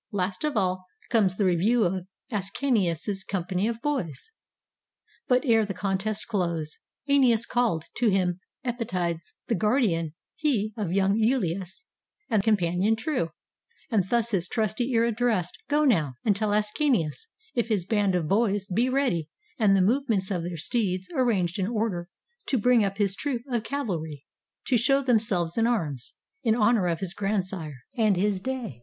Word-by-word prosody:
Last 190 +1 -2
of 300 -6 0
all 185 -1 0 0.2
comes 200 -6 +3
the 205 - +2
review 200 +7 +3
of 185 0 -1 0.2
Ascanius's 195 - 0
company 185 +1 -1
of 230 +1 -4
boys.] 275 - -3 1.0
But 250 +2 +3
ere 225 -3 +4
the 200 -2 -4
contest 200 +3 -2
closed, 170 -7 -2 0.3
^Eneas 250 -5 +4
calls 235 -10 0
To 240 -2 +3
him 185 -2 +1 0.3
Epytides, 180 -9 -2
— - - -64
the - - +1
guardian 190 - +1 0.2
he 220 -9 0
Of 205 -6 -3
young 195 +2 +2
lulus, 195 - 0 0.5
and 215 -3 +4
companion 195 0 +2
true, 225 - -1 0.3
— 465 - -35
And 195 -5 +1
thus 235 -1 +1
his 185 -4 +1
trusty 220 +4 -1
ear 230 -1 +3
addressed: 225 -6 0
"Go 300 +1 +3
now, 160 - +2
And 210 -3 +3
tell 210 +1 0
Ascanius, 210 - 0 0.3
if 235 -2 0
his 205 -6 0
band 205 -2 +1
of 170 -4 0
boys 205 0 +1
Be 230 +7 +1
ready, 255 - 0 0.3
and 200 -3 +5
the 185 - +4
movements 220 -3 +1
of 180 -3 0
their 170 0 -5
steeds 185 +1 -1
Arranged 210 - +1
in 190 - 0
order, 210 -6 -2 0.4
to 265 - +2
bring 245 0 +4
up 195 0 -2
his 200 -2 +2
troop 255 -3 -3
Of 240 -4 -1
cavalry, 165 - -4 0.4
to 255 - +3
show 275 +3 +3
themselves 215 -7 +1
in 225 - +3
arms. 155 - -2 0.3
In 225 -3 +2
honor 215 -4 +3
of 165 -2 -1
his 190 -2 -3
grandsire, 185 -9 -3
and 215 -6 +3
his 195 0 +1
day." 245 - -4
205 Hz, 165 wpm, -26 LUFS, 180-235 Hz, 1.0 s, and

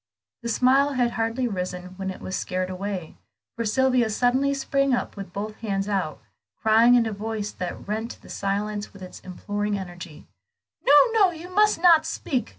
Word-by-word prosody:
The 235 - -4
smile 265 +4 +3
had 245 -2 +1
hardly 230 +3 -1
risen 180 -3 -5
when 190 -1 -3
it 190 - -7
was 185 - -4
scared 185 0 -2
away, 185 -3 -5 0.4
for 230 - -2
Sylvia 250 +1 +2
suddenly 250 +5 +2
sprung 275 -1 +1
up - - -4
with 195 -3 -8
both 210 +3 -5
hands 195 -3 -2
out, 190 -7 -2 0.4
crying 225 +3 +5
in 240 -2 +4
a 220 - -2
voice 210 0 -4
that 180 +1 -6
rent 220 +3 -3
the - - -14
silence 205 +1 -3
with 195 -2 -11
its 185 - -10
imploring 205 +3 -3
energy 175 -4 -9 0.6
"No, 285 - +6 0.2
no, 425 -4 +5
you 350 +2 -9
must 420 -2 +4
not 330 -2 +6
speak! 265 -5 -2
215 Hz, 175 wpm, -25 LUFS, 195-255 Hz, 0.6 s, No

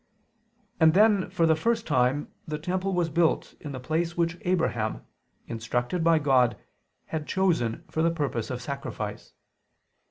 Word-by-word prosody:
And 160 +1 +5
then 205 -2 +4
for 165 - +1
the 160 -1 +4
first 230 +7 0
time 130 0 +1 0.2
the 155 -1 -3
temple 185 +4 -2
was 175 -2 +2
built 165 +1 +1
in 145 - -7
the 130 - -5
place 165 +6 -2
which 170 0 0
Abraham, 165 -12 -1 0.4
instructed 120 +8 -2
by 165 -1 +5
God, 130 -5 +3 0.5
had 155 -2 -4
chosen 170 - 0
for 160 - -2
the 165 - +4
purpose 145 -9 -2
of 125 -1 -4
sacrifice. 140 +2 -5
160 Hz, 150 wpm, -27 LUFS, 130-175 Hz, 0.5 s, And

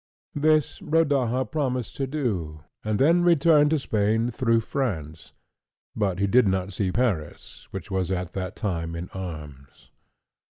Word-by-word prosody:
This 155 0 +2
Rodaja 135 -6 +1
promised 130 -5 -2
to 135 - -1
do, 95 - -3 0.2
and 110 -1 0
then 165 +8 +4
returned 165 -3 +5
to 160 - +2
Spain 110 -2 0
through 115 -1 +2
France, 85 - -4 0.6
but 95 -4 0
he 100 - +1
did 115 +3 +4
not 95 0 -1
see 95 0 -1
Paris, 100 -10 -2
which 95 +1 -7
was 95 -2 -1
at 90 -1 -3
that 95 -1 -4
time 85 -6 -3
in 85 +2 -6
arms. 75 -8 -9
105 Hz, 145 wpm, -25 LUFS, 90-135 Hz, 0.6 s, returned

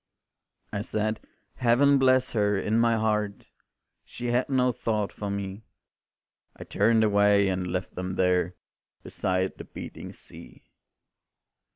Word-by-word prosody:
I 100 - -2
said, 110 0 -2 0.4
Heaven 135 +3 +4
bless 130 -1 +3
her, 105 -2 +1
in 110 +3 0
my 115 0 +3
heart, 105 -2 -2 0.5
She 120 0 -5
had 125 +3 +1
no 125 -2 +2
thought 110 -4 -2
for 105 - -5
me; 100 0 -4 0.9
I - - -9
turned 110 +2 +2
away 100 -1 +4
and 90 -1 -2
left 90 +1 -3
them 90 0 -4
there 90 -1 +1 0.5
Beside 95 0 -2
the - - -6
beating - - -9
sea. - - -14
105 Hz, 130 wpm, -26 LUFS, 95-120 Hz, 0.9 s, Heaven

